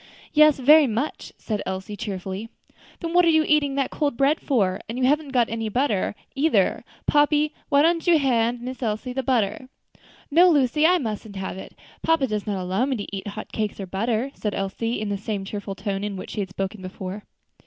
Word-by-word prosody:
"Yes, 305 -1 +6
very 295 +3 +6
much," 240 +6 -3
said 215 -2 -3
Elsie, 190 +2 -5
cheerfully. 195 +1 -5 0.5
"Then 335 0 -3
what 355 0 +6
are 335 - +4
you 315 -1 +4
eating 290 -2 +2
that 275 -1 0
cold 285 -5 -1
bread 280 +3 +3
for? 195 -9 0
and 230 - -4
you 260 - -1
haven't 295 +3 +2
got 245 -4 +2
any 225 -1 -3
butter, 215 -4 0 0.2
either. 300 +4 +2 0.2
Pompey, 295 +1 +3 0.2
why 285 0 +5
don't 335 0 +2
hand 245 -8 +2
Miss 255 0 -6
Elsie 225 +2 -2
the 265 - -1
butter?" 250 -1 0 0.6
"No, 350 +5 +7
Lucy, 300 0 +3
I 360 +1 +4
mustn't 220 - -5
have 190 0 -5
it. - - -11 0.3
Papa 325 -4 +2
does 215 -4 -3
not 200 -2 -1
allow 185 +6 0
me 270 - 0
to 205 -2 -5
eat 195 - -6
hot 210 +1 -7
cakes 215 -2 -3
or 195 - -4
butter," 225 +7 -1
said 210 -2 -3
Elsie, 225 +5 -2
in 215 -1 -3
the 200 -1 -2
same 200 -1 -4
cheerful 200 0 -5
tone 195 0 -3
in 205 -1 -3
which 185 - -7
she - - -5
had 195 -2 -2
spoken 195 +2 -4
before. 185 +2 -7
230 Hz, 205 wpm, -24 LUFS, 200-285 Hz, 0.6 s, No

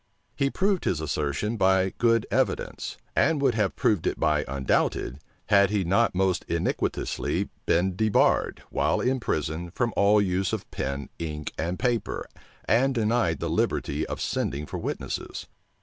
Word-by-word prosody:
He 140 - +1
proved 195 +3 0
his 85 - +1
assertion 80 +8 -1
by 95 -1 +3
good 115 -2 +3
evidence; - - -1 0.2
and 155 0 +3
would 135 -3 +3
have 105 -3 0
proved 100 -7 +1
it - - -1
by 75 -1 +2
undoubted, 65 -1 0 0.3
had 100 -1 +5
he 105 -2 +1
not 100 +4 +2
most 95 -1 +1
iniquitously 85 0 -1 0.2
been 90 +2 +2
debarred, 110 +1 +2
while - - +1
in 130 +1 +1
prison, 80 -4 -2
from 120 +6 -1
all 105 +1 +5
use 95 -1 0
of - - -4
pen, 70 0 -3
ink, 75 -2 -4
and 85 +3 -2
paper, 120 0 -1 0.4
and 130 +3 +3
denied 110 - +1
the - - -2
liberty - - 0
of - - -5
sending 70 +2 -2
for - - -5
witnesses. - - -4
95 Hz, 150 wpm, -26 LUFS, 80-115 Hz, 0.4 s, had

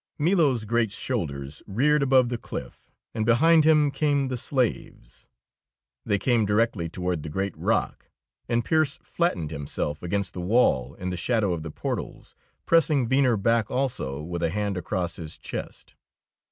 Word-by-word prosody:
Milo's 150 - +2
great 115 -1 +1
shoulders 75 - -4
reared 140 +9 +2
above 130 -3 +4
the 120 -1 -3
cliff, - - -8 0.2
and 110 - -1
behind 155 +8 +5
him 150 -2 +4
came 140 -1 +1
the 130 - -2
slaves. 120 - -3 0.8
They 100 - +2
came 115 +2 +2
directly 105 -4 +1
toward 90 -2 -2
the 75 - -6
great 95 +4 -2
rock, - - -1 0.4
and 120 -1 +1
Pearse 155 -3 +1
flattened 90 - -1
himself 75 0 -4
against 95 +2 -2
the 90 - -5
wall 90 - +2
in 90 0 -4
the 90 - -3
shadow 105 +1 +1
of 85 - -4
the 80 - -6
portals, - - -5 0.3
pressing 155 -6 +3
Venner 130 -2 +3
back 115 +1 +1
also 115 - -2
with 85 +1 -4
a 85 - +1
hand 100 +2 -2
across 90 -1 -3
his 80 -3 -8
chest. - - -8
110 Hz, 155 wpm, -25 LUFS, 90-130 Hz, 0.8 s, behind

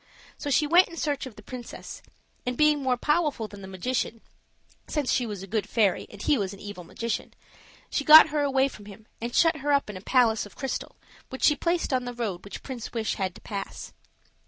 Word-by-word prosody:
So 290 - -5
she 290 +2 +3
went 345 +5 +6
in 335 - -11
search 290 -4 -1
of 240 - -12
the - - -13
princess, 250 -2 -8 0.4
and 250 0 -3
being 300 -1 +4
more 255 -2 +1
powerful 295 -5 +1
than 205 -1 -12
the 190 - -8
magician, 225 +4 -2 0.7
since 295 -4 -1
she 245 -2 +1
was 205 -3 -6
a - - -6
good 210 +1 -2
fairy 205 -5 +2
and 205 - -12
he 275 +5 +2
was 195 -1 -2
an - - -16
evil 205 -3 -8
magician, 230 +6 -4 0.6
she 285 - 0
got 310 +2 +10
her 300 0 0
away 270 -1 +3
from 215 -6 -11
him 210 +1 -12 0.2
and 235 +1 -4
shut 330 -2 +4
her 290 0 -1
up 280 -6 +2
in 195 - -8
a - - -10
palace 230 -1 +3
of - - -19
crystal, 270 -2 -4 0.3
which 260 - -7
she 300 - +6
placed 340 -3 0
on 255 -1 +1
the 245 0 -5
road 210 -7 -3
which 200 - -9
Prince 250 -4 -7
Wish 225 -2 -1
had 185 -2 -2
to - - -13
pass. 200 -2 -6
245 Hz, 225 wpm, -27 LUFS, 210-290 Hz, 0.7 s, got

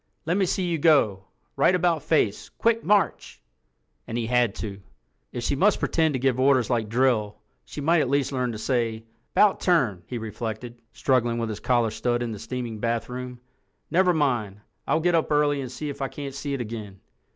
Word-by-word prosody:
"Let 170 +3 +1
me 195 -1 +2
see 185 +1 0
you 170 -2 -1
go. 115 - +3 0.3
Right 185 - +4
about 175 -3 +1
face—quick 165 - 0
march!" 200 -5 +1 0.7
And 115 - -3
he 120 - -1
had 120 -2 +2
to. 100 -2 -6 0.5
"If 120 - -5
she 140 - 0
must 200 +8 +3
pretend 160 -3 +1
to - - -1
give 130 -1 +1
orders 130 -2 +3
like 115 -3 0
drill, 115 -3 +1 0.3
she 145 - -7
might 165 +3 +3
at 130 - -1
least 140 0 +1
learn 125 -2 -1
to 110 - -6
say 115 -1 -1 0.3
''Bout 210 -2 +4
turn!'" 125 - +2
he 125 - -4
reflected, 115 +1 -6
struggling 120 -3 +1
with 115 -1 -2
his 105 - -5
collar 120 -3 +1
stud 120 +2 -1
in 120 - -3
the 105 - -6
steaming 120 -3 -5
bathroom. 125 +2 -3 0.5
"Never 180 +1 +4
mind. 120 - 0 0.3
I'll 160 - +2
get 175 +1 +2
up 165 -2 +1
early 145 -1 +2
and 130 -2 -6
see 150 +3 -5
if 140 - -7
I 135 - 0
can't 140 +1 -7
see 140 0 -3
it 130 - -4
again." 105 -4 -7
125 Hz, 195 wpm, -25 LUFS, 115-150 Hz, 0.7 s, Right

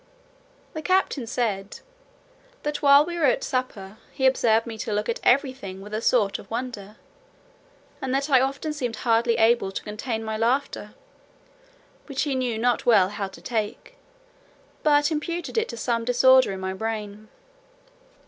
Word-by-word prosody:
The 315 - -5
captain 340 -8 0
said, 210 -5 -3 0.8
"that 295 0 -3
while 280 +1 +6
we 345 0 -5
were 310 - +3
at 260 - +2
supper, 220 -6 -4
he 265 - -2
observed 230 -4 +3
me 230 -2 -6
to 215 - -4
look 210 0 -1
at 235 - -2
every 265 +1 +3
thing 195 -7 -9
with 205 +2 -11
a 215 - -2
sort 215 -5 +2
of - - -13
wonder, 225 -4 -5 1.1
and 265 -1 -3
that 275 +2 0
I 265 -4 +5
often 275 +3 -2
seemed 245 -6 -3
hardly 230 0 +2
able 225 -3 +3
to - - -5
contain 220 +2 -4
my 220 0 -3
laughter, 235 -2 -1 1.1
which 275 -2 -2
he 290 -2 -1
knew 250 -3 -1
not 240 +1 +1
well 205 -6 +4
how 205 -1 -4
to 190 -3 -14
take, 220 - -4 0.9
but 290 0 +3
imputed 335 +3 -3
it 450 0 0
to 235 - -6
some 230 0 -1
disorder 255 0 +5
in 190 - -5
my 190 0 -3
brain." 215 0 -5
235 Hz, 165 wpm, -24 LUFS, 215-270 Hz, 1.1 s, while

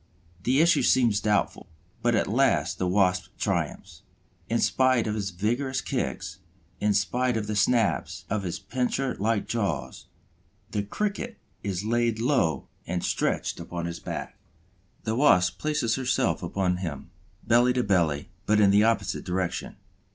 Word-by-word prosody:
The 130 +8 +3
issue 170 +1 +4
seems 115 -5 +3
doubtful. 105 -4 0 0.3
But 120 0 +2
at 110 - +2
last 115 -5 +1
the 90 - 0
Wasp 90 -1 +2
triumphs. - - -3 0.5
In 115 - +2
spite 130 -1 +3
of 105 - -1
his 100 -2 -2
vigorous 120 +9 -1
kicks, 75 +7 -3 0.4
in 105 -1 +2
spite 125 +4 +1
of 110 - -2
the 105 0 -3
snaps 115 +3 +1
of 105 +1 -1
his 90 -3 -3
pincer 125 +5 -2
like 110 0 0
jaws, 100 -11 -3 0.6
the 105 - 0
Cricket 210 - -3 0.2
is 100 0 -3
laid 115 0 +1
low 120 - +1 0.2
and 90 0 -2
stretched - - -1
upon 85 0 -5
his 85 0 -5
back. - - -6 0.6
The 110 - -1
Wasp 90 -10 +4
places 150 -7 0
herself 130 -3 0
upon 90 +1 0
him, 85 -7 -6 0.3
belly 120 +2 +4
to 125 -1 +1
belly, 85 -8 +1 0.2
but 105 0 +4
in 100 -2 +6
the 105 +1 +5
opposite 110 -4 0
direction. 90 -1 -3
105 Hz, 150 wpm, -26 LUFS, 95-125 Hz, 0.6 s, in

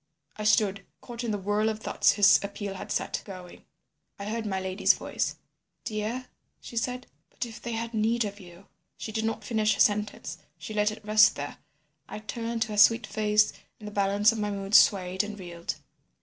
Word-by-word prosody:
"I 215 - -5
stood, 205 -2 +3 0.2
caught 240 -1 -7
in 235 - -2
the 210 - 0
whirl 205 +2 +1
of 220 - -2
thoughts - - +2
his 205 -1 +6
appeal 200 0 -5
had 190 - -7
set - - -1
going. 185 -3 -11 0.5
"I 200 - -6
heard 220 +1 -3
my 190 -2 -1
lady's 190 +1 +2
voice. - - -2 0.5
"'Dear,' 220 +4 -3 0.3
she - - -11
said; 250 +2 -2 0.2
'but - - -4
if 225 -2 -10
they 235 - -4
had 230 +1 -3
need 225 +1 +1
of 205 0 -6
you—' 175 0 -14 0.3
"She 220 - -6
did 220 0 -1
not 225 -1 -2
finish 215 -1 +1
her - - -10
sentence, 210 0 +1 0.2
she 215 - -7
let 210 0 +2
it 215 0 -9
rest 215 0 +6
there. 145 0 -6 0.5
I - - -6
turned 230 +2 -3
to 220 - -8
her 210 -1 -1
sweet 230 +2 +6
face, 210 0 +2 0.2
and 210 - -10
the - - -6
balance 200 +2 +3
of 225 - -4
my 210 0 -1
mood 200 0 -5
swayed 185 -2 +5
and 210 0 -6
reeled. 170 -2 -5
210 Hz, 200 wpm, -28 LUFS, 200-220 Hz, 0.5 s, his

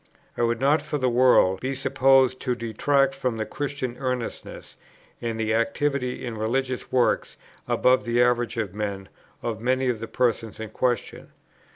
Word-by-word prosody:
I - - -3
would 115 0 +1
not 145 +4 +3
for 150 0 -3
the 130 -3 +1
world 120 -7 +4
be 135 +1 -2
supposed 130 -1 +3
to 125 -2 -1
detract 135 +4 +1
from 130 -4 -2
the 110 - -2
Christian 140 -3 -4
earnestness, 125 -3 -5 0.5
and 115 -1 -3
the 110 0 0
activity 125 +3 -1
in 115 -3 -5
religious 130 +3 -2
works, 125 -2 +1 0.3
above 130 0 +3
the 120 0 0
average 120 -1 +2
of 105 -5 -2
men, 100 -2 -4 0.3
of 110 -2 -3
many 130 +2 +1
of 120 -3 -1
the 115 - -5
persons 115 -4 -1
in 110 -1 -6
question. 120 +1 -2
125 Hz, 165 wpm, -25 LUFS, 115-130 Hz, 0.5 s, world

